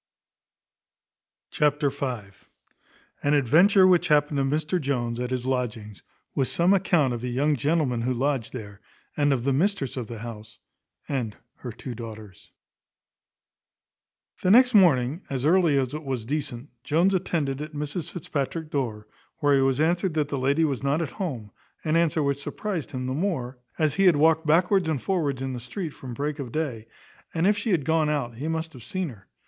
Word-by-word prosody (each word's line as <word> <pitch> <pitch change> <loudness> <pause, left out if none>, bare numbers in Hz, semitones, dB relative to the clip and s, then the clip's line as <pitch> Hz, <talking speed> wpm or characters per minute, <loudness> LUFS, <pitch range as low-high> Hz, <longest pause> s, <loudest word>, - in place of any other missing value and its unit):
Chapter 145 -1 +2
v. 130 -4 -3 1.0
An 145 +1 +2
adventure 175 - +5
which 180 -2 +4
happened 150 -1 +3
to - - +2
Mr 155 +5 0
Jones 120 -4 -1
at 125 0 -2
his 130 -1 -2
lodgings, 110 -7 -3 0.3
with 135 - +1
some 175 +3 +3
account 175 -9 +2
of 120 0 -5
a - - -2
young 140 +5 +1
gentleman 140 -2 0
who 125 +2 0
lodged 130 -1 -1
there, 105 -5 -9 0.3
and 145 -1 +2
of 130 -4 0
the 135 +1 +1
mistress 150 - 0
of 120 -3 -4
the 115 - -7
house, 110 -1 -9 0.5
and 120 -7 -3 0.2
her 125 - -7
two 125 +3 -7
daughters. 110 -4 -10 1.9
The 185 - +1
next 250 +5 +6
morning, 160 - +4
as 135 -1 -2
early 165 -3 +4
as 130 0 0
it 155 +1 -5
was 130 -5 -3
decent, 140 -1 -4
Jones 175 +6 +2
attended 155 -7 -1
at 150 +1 -7
Mrs 150 +2 -4
Fitzpatrick's 155 -1 -4
door, 115 -7 -2 0.3
where 145 -3 +3
he 135 - +3
was 135 0 +2
answered 170 +2 +1
that 150 -2 0
the 140 - -2
lady 140 +5 +2
was 140 -4 -2
not 140 +4 +1
at 145 - -5
home; 125 - -5 0.3
an 155 0 0
answer 165 -2 +2
which 140 0 -1
surprized 185 -1 -4
him 130 -1 -4
the 130 - -2
more, 135 -7 -2 0.2
as 155 -3 +1
he 195 +5 +2
had 180 -4 +6
walked 160 +2 +3
backwards 180 +2 +3
and 155 -4 0
forwards 145 -9 -1
in 135 0 -3
the 125 - -4
street 160 - -5
from 130 -4 -9
break 150 +2 -3
of 130 -4 -5
day; 125 -8 -3 0.5
and 165 +1 +1
if 205 +2 +4
she 205 +3 -3
had 165 -9 +1
gone 160 -1 +2
out, 130 -6 -2
he 145 +5 -4
must 160 0 -3
have 125 -4 -12
seen 180 +7 -3
her. 105 -6 -14
145 Hz, 185 wpm, -25 LUFS, 125-160 Hz, 1.9 s, next